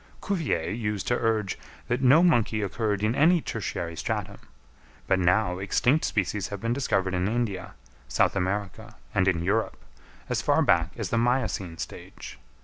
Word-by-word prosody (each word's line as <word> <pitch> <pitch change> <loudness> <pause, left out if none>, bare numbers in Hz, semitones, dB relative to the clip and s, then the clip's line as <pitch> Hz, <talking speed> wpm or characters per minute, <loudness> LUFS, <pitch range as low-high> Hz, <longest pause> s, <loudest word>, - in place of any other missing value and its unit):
Cuvier 165 - -1
used 105 -3 -2
to 120 - +3
urge 110 -4 0 0.3
that 120 +2 -1
no 135 +6 +6
monkey 115 -10 +2
occurred 105 0 -1
in 110 +2 +2
any 170 +6 +4
tertiary 85 - -4
stratum; - - -3 0.7
but 95 - +2
now 90 0 +2
extinct 125 +9 +2
species 100 -1 -1
have 100 - -6
been 115 +3 -1
discovered 100 -8 0
in 90 +1 0
India, 110 -4 -2 0.3
South 60 - +2
America 100 +4 -3 0.2
and 95 -2 +2
in 85 -3 +1
Europe, 105 +5 0 0.5
as - - -1
far - - +3
back 85 0 +3
as 110 -6 -4
the 115 - +2
miocene 115 -8 0
stage. - - -8
105 Hz, 155 wpm, -26 LUFS, 95-120 Hz, 0.7 s, no